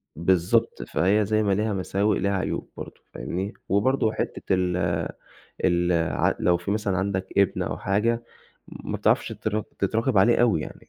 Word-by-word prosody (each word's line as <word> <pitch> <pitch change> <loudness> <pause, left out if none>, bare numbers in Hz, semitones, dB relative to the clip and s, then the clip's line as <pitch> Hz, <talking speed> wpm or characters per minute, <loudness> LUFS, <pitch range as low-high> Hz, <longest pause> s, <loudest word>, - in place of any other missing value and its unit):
بالضبط، 95 +7 +1
فهي 100 +6 +1
زي 110 +1 +1
ما 100 - +1
ليها 105 +2 0
مساوئ 100 +2 0
ليها 100 - 0
عيوب 95 - -3
برضه، - - -9
فاهمني؟ 95 +4 -4 0.2
وبرضه 110 +3 +2
حتة - - -4
ال 90 -1 +1 0.9
الع 85 -2 +2
لو 90 -1 +3
في 85 +3 -5
مثلًا 105 -3 0
عندك 95 -1 -1
ابن 100 - +2
أو - - -3
حاجة، 115 +4 0 0.4
ما - - -6
بتعرفش - - +2
تر 110 0 -2 0.2
تتراقب 110 +3 +1
عليه 115 +5 +5
أوي 105 -10 +3
يعني، - - -9
100 Hz, 155 wpm, -25 LUFS, 90-110 Hz, 0.9 s, عليه